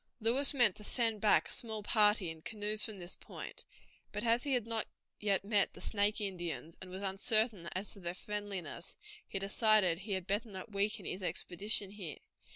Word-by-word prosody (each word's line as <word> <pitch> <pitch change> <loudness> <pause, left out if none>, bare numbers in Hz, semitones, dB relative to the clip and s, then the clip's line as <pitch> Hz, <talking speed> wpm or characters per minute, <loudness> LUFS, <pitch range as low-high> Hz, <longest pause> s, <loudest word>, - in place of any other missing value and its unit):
Lewis 245 +5 +3
meant 240 -9 +4
to 210 - -10
send 225 -1 0
back 215 - +5
a - - -9
small 220 -3 -3
party 210 -4 +4
in 160 -1 -10
canoes 210 +2 0
from 215 -4 -2
this 175 0 -6
point, - - -9 0.5
but 210 +1 -3
as 235 +1 +3
he 280 - +1
had 240 -3 0
not 230 -1 -1 0.3
yet 200 -2 +1
met 205 -2 +3
the - - -12
Snake 205 0 +2
Indians, 175 -5 -4
and 185 - -8
was 190 +2 -6
uncertain 200 -1 +2
as 190 +3 -3
to 200 - -11
their 175 -1 -4
friendliness, 195 -6 -5 0.3
he - - -2
decided 195 -3 +3
he 200 +1 -4
had 190 -2 -1
better 210 +4 -1
not 190 +2 -7
weaken 205 0 0
his 185 - -4
expedition 195 +2 0
here. 190 -7 -6
205 Hz, 190 wpm, -34 LUFS, 190-220 Hz, 0.5 s, back